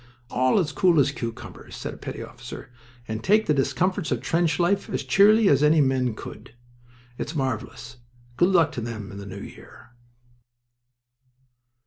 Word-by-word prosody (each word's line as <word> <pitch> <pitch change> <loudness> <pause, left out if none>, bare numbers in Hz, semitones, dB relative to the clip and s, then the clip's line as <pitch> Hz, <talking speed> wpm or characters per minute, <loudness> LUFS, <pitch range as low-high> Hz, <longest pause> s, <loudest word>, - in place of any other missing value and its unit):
"All 130 +6 +2
as 170 -6 +1
cool 170 +3 +3
as 140 0 +3
cucumbers," 115 -7 -8
said - - -6
a - - -11
petty - - -7
officer, - - -10 0.4
"and 110 0 -4
take 215 +2 +3
the 150 - +2
discomforts 155 +7 0
of - - 0
trench 165 -3 0
life 185 +3 +1
as - - -2
cheerily 210 +2 +5
as 140 -6 +4
any 150 +1 +5
men 130 -4 +1
could. 110 - -10 0.6
It's 160 - -4
marvelous. 130 -2 -4 0.4
Good 175 +8 +3
luck 170 -5 +3
to 120 - -5
them 110 -3 -6
in 100 - -8
the 100 - -9
new 95 0 -8
year!" - - -13
145 Hz, 160 wpm, -24 LUFS, 120-175 Hz, 0.6 s, cheerily